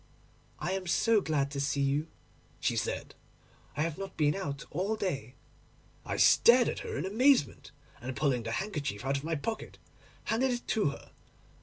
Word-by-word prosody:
"I - - -3
am 190 -1 -3
so 220 +4 +3
glad 140 -5 0
to 140 - -4
see 140 0 0
you," 140 +3 +1 0.5
she - - 0
said; - - -3 0.6
"I 150 - +2
have 160 -2 -3
not 195 -1 -7
been 150 -1 +3
out 140 -8 -4
all 190 +7 -1
day." 140 - -3 0.7
I - - -2
stared 240 +1 +6
at - - -2
her - - -5
in 145 - -2
amazement, 230 - +2 0.3
and 125 +1 -5
pulling 135 -5 +1
the 115 0 -4
handkerchief 145 - -3
out 135 +1 +1
of 140 - -6
my 165 +1 -1
pocket, 220 +9 -4 0.5
handed 250 +4 +1
it 245 -1 -3
to 210 -9 +2
her. 140 - -10
155 Hz, 175 wpm, -30 LUFS, 140-205 Hz, 0.7 s, stared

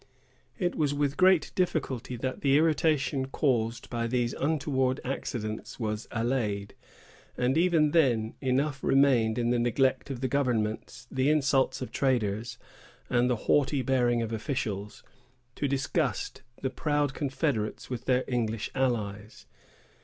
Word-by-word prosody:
It 180 -4 0
was 145 -2 0
with 145 -1 0
great 185 -4 +4
difficulty 135 -9 -1
that 130 +2 -4
the 140 0 +4
irritation 150 -4 +2
caused 120 -4 0
by 115 -1 -1
these 120 0 0
untoward 135 -3 0
accidents 110 -5 -4
was 110 -1 -3
allayed; 110 -4 -1 0.6
and 125 +2 +1
even 165 -3 +3
then 120 -9 +2
enough 135 +1 0
remained 130 -5 +3
in 120 0 +1
the 120 - +2
neglect 130 +3 +1
of 130 -1 -2
governments, 120 -6 -1
the 130 +2 +1
insults 140 -3 +2
of - - -7
traders, 115 -3 0 0.5
and 125 0 +3
the 125 - +2
haughty 140 -2 +2
bearing 120 -3 +2
of 115 0 -4
officials, 105 -4 -3 0.5
to 140 - -2
disgust 135 -1 -1 0.2
the 130 - 0
proud 145 0 0
confederates 135 -6 -2
with 125 0 -4
their 130 -1 +2
English 115 -3 -2
allies. 110 -3 -2
130 Hz, 130 wpm, -28 LUFS, 115-140 Hz, 0.6 s, great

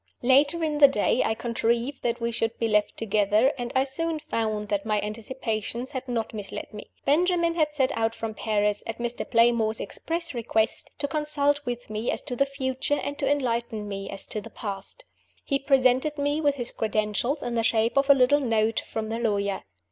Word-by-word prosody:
Later 285 +6 +4
in 300 -2 0
the 285 - +10
day 255 -1 +1
I 220 - 0
contrived 235 +3 -1
that 235 0 -1
we 235 0 -1
should 225 0 -1
be 230 - 0
left 210 -1 +1
together, 215 +4 +2
and 245 -2 -4
I 260 - +4
soon 320 +4 -2
found 215 -7 -2
that 200 -1 0
my 215 -1 +1
anticipations 225 +2 -4
had 260 -2 -5
not 230 -3 -2
misled 210 0 -6
me. 210 - -9 0.2
Benjamin 340 +3 +3
had 305 -3 0
set 265 -3 +1
out 225 0 0
for 225 -1 -4
Paris, 210 -1 0
at 225 - -4
Mr. 240 0 -3
Playmore's 230 -2 +3
express 335 0 -3
request, 225 -2 0
to 285 - -1
consult 290 -1 +1
with 240 -2 -4
me 215 +2 -2
as - - -1
to 255 -4 -4
the 275 +3 +2
future, 275 +1 -1
and 285 - -3
to 275 - +1
enlighten 235 -6 -1
me 195 -1 -5
as 195 - 0
to 215 - -5
the - - -10
past. 200 - -5 0.4
He 275 - +1
presented 270 +2 +3
me 290 +2 0
with 290 -2 +2
his 245 -3 -2
credentials 215 +6 -1
in 245 - -3
the 230 - +1
shape 225 0 +2
of 275 +1 +2
a 280 - +9
little 270 +2 +4
note 225 -3 +1
from 220 -1 -5
the 225 +1 -2
lawyer. 200 -4 0
240 Hz, 200 wpm, -26 LUFS, 220-280 Hz, 0.4 s, the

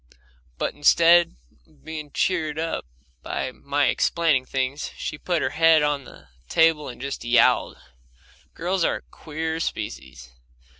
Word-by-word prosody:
But - - -2
instead 170 - +5 0.3
of - - -27
being 155 -2 -6
cheered 155 -4 -1
up 165 - -3 0.3
by 130 - -3
my 140 +2 -1
explaining 150 0 +1
things, 135 +2 -2
she 150 - -5
put 175 -3 -1
her 130 - -1
head 160 -1 +4
on 145 -2 -1
the - - -15 0.2
table 160 -2 +3
and 120 - -10
just 140 +2 -5
yowled. 120 0 +3 0.8
Girls 180 +2 -1
are - - +1
a - - -7
queer 160 +1 -5
species. 65 - -6
150 Hz, 140 wpm, -24 LUFS, 135-165 Hz, 0.8 s, instead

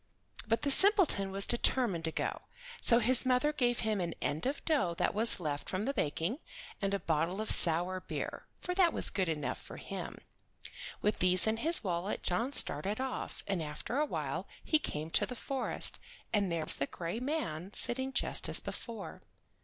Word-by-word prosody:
But 225 +1 0
the 285 - +1
simpleton 380 - +4
was 195 +1 0
determined 235 -8 0
to 160 - -2
go, - - -3 0.4
so 235 - +6
his 245 +2 +1
mother 260 +4 +1
gave 245 -4 0
him 215 -3 -1
an 170 -1 -4
end 155 - -2
of 280 +2 -4
dough 275 - 0
that - - 0
was 220 0 +5
left 150 -4 -4
from 190 +3 -3
the 275 - -1
baking 185 - -2 0.4
and 200 0 0
a - - -3
bottle 165 +4 -1
of 220 - -3
sour 175 +2 +5
beer, 185 - -6
for 360 - -4
that 360 -2 +3
was - - +2
good 190 -4 -1
enough 150 -3 -3
for - - -11
him. - - -7 0.9
With 210 +1 0
these 185 0 +3
in 220 0 0
his 325 +6 +4
wallet 180 +1 -3
John 230 +9 -1
started 210 -5 +4
off, 265 0 -5
and 195 -4 -2
after 155 - -4
awhile 300 - -3 0.2
he 310 - +2
came 155 - -5
to - - +2
the 250 - -7
forest, 270 +2 +3 0.3
and 200 -4 +1
there 165 -2 -2
was - - +4
the 140 - -2
gray 170 +6 -5
man 240 - -4
sitting 260 +2 +3
just - - 0
as - - +2
before. 230 -4 -8
210 Hz, 185 wpm, -31 LUFS, 175-260 Hz, 0.9 s, so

